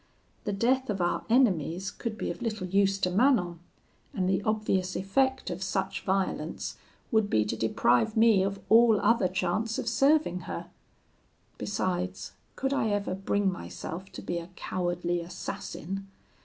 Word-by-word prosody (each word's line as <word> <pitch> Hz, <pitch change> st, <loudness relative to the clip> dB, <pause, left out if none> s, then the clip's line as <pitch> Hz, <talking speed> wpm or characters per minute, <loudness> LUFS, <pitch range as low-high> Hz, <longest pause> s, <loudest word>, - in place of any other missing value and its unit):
The 210 Hz, -, 0 dB
death 250 Hz, +6 st, +1 dB
of 200 Hz, -2 st, -1 dB
our 175 Hz, 0 st, 0 dB
enemies 190 Hz, -, +2 dB
could 220 Hz, 0 st, -5 dB
be -, -, -2 dB
of -, -, -9 dB
little 220 Hz, -5 st, -2 dB
use 195 Hz, +1 st, +2 dB
to 180 Hz, -2 st, 0 dB
Manon; 195 Hz, -, +3 dB, 0.6 s
and 185 Hz, -2 st, 0 dB
the 190 Hz, +1 st, +2 dB
obvious 200 Hz, -3 st, 0 dB
effect 260 Hz, +4 st, +1 dB
of 175 Hz, +1 st, -5 dB
such 195 Hz, 0 st, -2 dB
violence 190 Hz, -4 st, -1 dB, 0.4 s
would 220 Hz, -3 st, +3 dB
be 110 Hz, -, +3 dB
to 105 Hz, -, -2 dB
deprive 120 Hz, -, +2 dB
me 220 Hz, -3 st, +6 dB
of 195 Hz, +1 st, -1 dB
all 225 Hz, -1 st, +6 dB
other 230 Hz, -5 st, +3 dB
chance 190 Hz, +5 st, -1 dB
of -, -, -3 dB
serving 275 Hz, -, +3 dB
her. -, -, -5 dB, 0.9 s
Besides, 95 Hz, -, -2 dB, 0.2 s
could 270 Hz, +1 st, -1 dB
I 275 Hz, -, +1 dB
ever 205 Hz, -2 st, -1 dB
bring 195 Hz, +1 st, 0 dB
myself 185 Hz, 0 st, -7 dB
to -, -, -8 dB
be 175 Hz, -, -2 dB
a 170 Hz, +1 st, -9 dB
cowardly 175 Hz, -1 st, -1 dB
assassin? 190 Hz, +2 st, -6 dB
195 Hz, 155 wpm, -28 LUFS, 180-220 Hz, 0.9 s, me